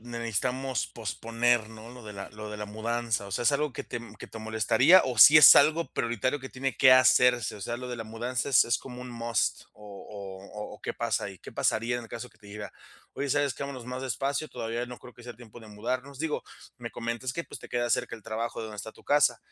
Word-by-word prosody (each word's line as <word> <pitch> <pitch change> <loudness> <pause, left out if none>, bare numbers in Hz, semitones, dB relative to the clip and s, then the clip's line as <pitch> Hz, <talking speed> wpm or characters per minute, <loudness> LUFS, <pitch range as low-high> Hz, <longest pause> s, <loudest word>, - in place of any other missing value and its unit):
ne 120 0 -7
necesitamos 125 +4 -2
posponer, 115 +1 -1
¿no?, 110 +1 -11
lo 125 -1 -12
de 105 -1 -9
la 100 0 -7
lo 105 0 -8
de 105 - -6
la 105 - -5
mudanza"? 110 0 -2
O - - -10
sea, 100 - -2
¿es 140 - +3
algo 145 -2 -1
que - - -5
te 120 - -5 0.2
que - - -8
te 115 - -10
molestaría? 110 - +4
¿O 125 -4 -3
sí 150 +6 +10
es 150 - +11
algo 160 +3 +4
prioritario 120 +4 -1
que 130 - -7
tiene 135 +1 -3
que 130 -2 +6
hacerse? 125 -3 +4
O - - -12
sea, 120 +4 -3
lo 125 0 -7
de 125 - -4
la 115 - -6
mudanza 120 +4 -3
es 130 - +6
es 120 -1 +1
como 125 -1 -9
un 125 - -8
must, 115 -3 -1
o 105 - -16 0.7
o 105 0 -7
o - - -15
¿qué - - -4
pasa - - -1
ahí? - - -8
¿Qué - - -12
pasaría 115 +2 0
en 120 - -8
el - - -13
caso 120 +1 -7
que - - -27
te 105 - -17
dijera: 105 0 -8 0.4
"Oye, 140 - -3
¿sabes 145 -1 +1
que? 140 - -7
Vámonos 135 -4 -6
más 125 +1 -5
despacio, 135 +4 -2
todavía 115 +2 -4
no 125 0 -8
creo 125 - -13
que 120 - -16
sea 120 0 -9
tiempo 120 -1 -13
de 110 - -13
mudarnos?" 125 +6 -4
Digo, 160 -1 -2 0.4
me 115 -1 -6
comentas 115 +2 -4
que, 170 - -3
pues, - - -10
te - - -11
queda 120 -1 -1
cerca 115 - 0
el 110 - -17
trabajo 115 +2 -4
de - - -4
donde 105 -1 -9
está 110 +3 -6
tu - - -20
casa, 145 -5 +3
120 Hz, 255 wpm, -28 LUFS, 110-130 Hz, 0.7 s, es